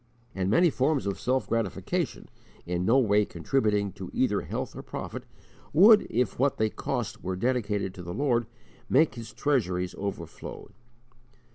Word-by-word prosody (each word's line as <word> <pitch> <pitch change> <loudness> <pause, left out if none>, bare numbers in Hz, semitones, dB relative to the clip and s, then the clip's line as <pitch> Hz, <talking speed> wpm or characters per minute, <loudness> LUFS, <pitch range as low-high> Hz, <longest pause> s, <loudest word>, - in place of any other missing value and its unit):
And 95 -1 -1
many 165 - +4
forms 135 0 +1
of 100 -1 -2
self 130 +1 0
gratification, 115 -1 -2 0.4
in 90 0 -1
no 115 +6 +4
way 105 -5 +4
contributing 105 - 0
to - - -8
either - - +1
health - - -5
or - - -6
profit, - - -6 0.5
would, 205 +7 +7
if 120 -2 0
what 140 +1 +2
they 110 -1 +1
cost - - -4
were 95 0 -2
dedicated 105 -3 -1
to 95 - -9
the 85 0 -6
Lord, 120 -5 +1 0.4
make 150 +4 +4
His 115 -3 -8
treasuries 110 -9 0
overflow. 95 -4 -6
110 Hz, 150 wpm, -28 LUFS, 95-130 Hz, 0.5 s, would